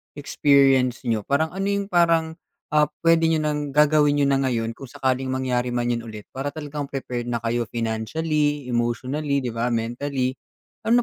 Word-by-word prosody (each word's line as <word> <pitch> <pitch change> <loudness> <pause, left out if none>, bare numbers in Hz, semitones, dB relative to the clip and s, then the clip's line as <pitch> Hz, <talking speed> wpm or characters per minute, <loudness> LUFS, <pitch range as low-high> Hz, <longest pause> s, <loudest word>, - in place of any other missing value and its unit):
experience 135 -3 +3
niyo, 110 -4 -1
parang 155 +3 +1
ano 195 +2 -3
'yung 200 -1 -1
parang, 165 -2 +2 0.3
ah, 150 0 +4 0.2
puwede 165 -1 +4
niyo 160 -1 +1
ng 150 -2 -2
gagawin 150 -1 +4
niyo 145 -1 +2
na 135 - +3
ngayon 115 -3 -1
kung 130 +3 -10
sakaling 130 +1 -1
mangyari 125 -2 -1
man 120 0 0
'yun 115 0 -2
ulit 105 -2 -8
para 135 +2 -4
talagang 145 -1 -5
prepared 125 -3 -4
na 120 -1 -2
kayo 115 0 -1
financially, 145 +5 -1
emotionally, 130 +4 -1
'di 120 - -2
ba, 115 +2 -1
mentally. 125 +3 -1 0.6
Ano 240 +1 +5
135 Hz, 170 wpm, -23 LUFS, 120-150 Hz, 0.6 s, Ano